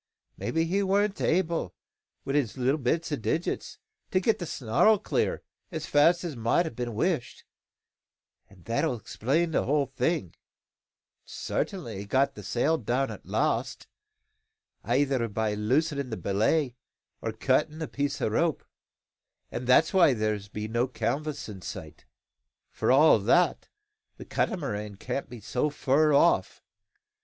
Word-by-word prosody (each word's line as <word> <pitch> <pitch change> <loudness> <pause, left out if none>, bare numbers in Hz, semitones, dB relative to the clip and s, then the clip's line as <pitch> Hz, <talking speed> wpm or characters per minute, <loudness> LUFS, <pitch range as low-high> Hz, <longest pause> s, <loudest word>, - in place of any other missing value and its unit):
Maybe 165 0 -1
he 190 +4 0
warn't 200 +1 +1
able, 165 - 0 0.5
wi' 135 - -2
his 135 -5 0
little 130 +4 +1
bits 160 +6 -1
o' - - +1
digits, 155 +7 -2 0.3
to 185 - +2
get 215 +4 +1
the 175 - -4
snarl 135 - +3
clear, - - -1 0.3
as 160 -2 -4
fast 165 +5 +4
as 165 -5 -4
mout 115 +9 +2
a' 160 - -4
been 120 -1 -5
wished; 160 - -1 1.1
an' 95 -3 -19
that'll 115 +4 0
explain 140 - -1
the - - +1
whole 145 +1 +2
thing. 135 - -1 0.9
Sartin 190 -7 -3
he 100 -4 -6
got 135 +6 +2
down - - -34
the 105 - -9
sail 125 - 0
at 130 +3 -1
last, - - -1 1.0
eyther 130 -1 +1
by 110 0 -1
loosin' 140 +6 0
the 110 - -4
belay, 120 +8 +1 0.5
or 115 - -2
cuttin' 130 +7 +1
the 160 -1 -4
piece 140 0 -2
o' - - +2
rope, 155 +9 0 0.9
and 120 +1 -5
that's 140 +8 +5
why 170 -8 +5
there 110 -1 0 0.2
be 105 0 -4
no 120 +3 0
canvas 140 +6 -3
in 100 -4 -9
sight. - - -8 0.7
For - - 0
all 140 -2 +6
that, 125 - +2 0.5
the - - -9
Catamaran 105 - -2
can't 125 +6 -4
be 120 -2 -9
so 125 +7 -1
fur 150 +1 +2
off. 150 +4 +3
135 Hz, 145 wpm, -28 LUFS, 115-160 Hz, 1.1 s, all